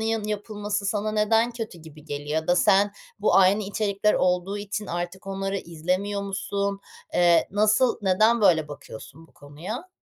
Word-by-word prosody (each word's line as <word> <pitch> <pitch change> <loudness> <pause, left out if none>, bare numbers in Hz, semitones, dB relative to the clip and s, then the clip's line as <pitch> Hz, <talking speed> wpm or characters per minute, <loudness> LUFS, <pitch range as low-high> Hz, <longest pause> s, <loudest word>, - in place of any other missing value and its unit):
yanı 220 -1 -1
yapılması 205 -1 -3
sana 215 +1 -1
neden 225 +2 +2
kötü 225 -7 -7
gibi 155 -1 -14
geliyor 145 -1 -6
ya 160 - -14
da 175 - +3
sen 200 +3 +4 0.3
bu 205 - +2
aynı 195 +2 +5
içerikler 205 +1 0
olduğu 180 +3 0
için 205 0 -5
artık 175 +3 -5
onları 195 0 -3
izlemiyor 185 +5 -2
musun? 200 0 -3 0.3
Eee, 175 -1 +4
nasıl 215 +5 +2
neden 215 +5 +3
böyle 160 -6 +4
bakıyorsun 145 +2 -11
bu - - -27
konuya? 185 - -8
200 Hz, 155 wpm, -25 LUFS, 175-210 Hz, 0.3 s, aynı